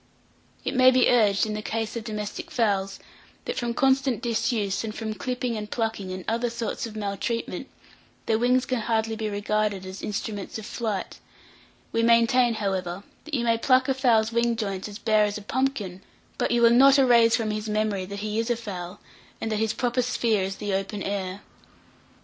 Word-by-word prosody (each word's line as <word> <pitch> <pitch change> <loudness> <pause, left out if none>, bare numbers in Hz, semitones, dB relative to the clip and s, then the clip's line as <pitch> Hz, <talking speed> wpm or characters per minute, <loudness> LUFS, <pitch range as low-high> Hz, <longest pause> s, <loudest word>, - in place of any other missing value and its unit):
It - - -1
may 255 -1 +7
be 255 -1 +4
urged, 210 -5 +4
in 215 - -3
the 215 - -3
case 225 +1 -3
of 230 - -4
domestic 210 -2 -5
fowls, 195 -4 0 0.5
that 480 - -3
from 235 -1 -2
constant 265 -3 +2
disuse, 230 -4 0
and 220 -1 -5
from 220 -1 -3
clipping 250 +3 -3
and 210 -1 -5
plucking, 220 -5 -2
and 185 -1 -6
other 235 +2 0
sorts 230 0 -3
of 220 - -11
maltreatment, 210 +3 -3 0.6
their 220 -1 +1
wings 250 +2 +3
can 255 -2 -1
hardly 225 0 0
be 220 -1 -3
regarded 205 -1 -1
as 185 +1 -8
instruments 205 0 -4
of 220 - -8
flight; 215 -5 -4 0.7
we 230 - +1
maintain, 235 +1 +4
however, 190 -3 -2 0.2
that 310 -1 -3
you 240 - 0
may 230 -1 +2
pluck 255 +2 +3
a 270 - +2
fowl's 235 -4 +3
wing 235 0 +1
joints 200 -3 -3
as 205 - -8
bare 215 -1 +3
as 205 +1 -2
a 210 - -9
pumpkin, 215 -7 -2 0.4
but - - +1
you 240 0 +2
will 235 - +7
not 270 +3 +7
erase 235 -4 +5
from 220 -2 -1
his 215 0 -3
memory 210 -2 0
that 200 +1 -6
he 215 +1 -2
is 230 +1 -1
a 240 - +2
fowl, 195 -5 -7 0.4
and 225 - -3
that 215 - 0
his 220 -1 +1
proper 245 +2 0
sphere 235 -4 +1
is 190 +1 -2
the 205 -1 -3
open 195 +1 -2
air. 195 -1 -3
220 Hz, 195 wpm, -25 LUFS, 205-235 Hz, 0.7 s, may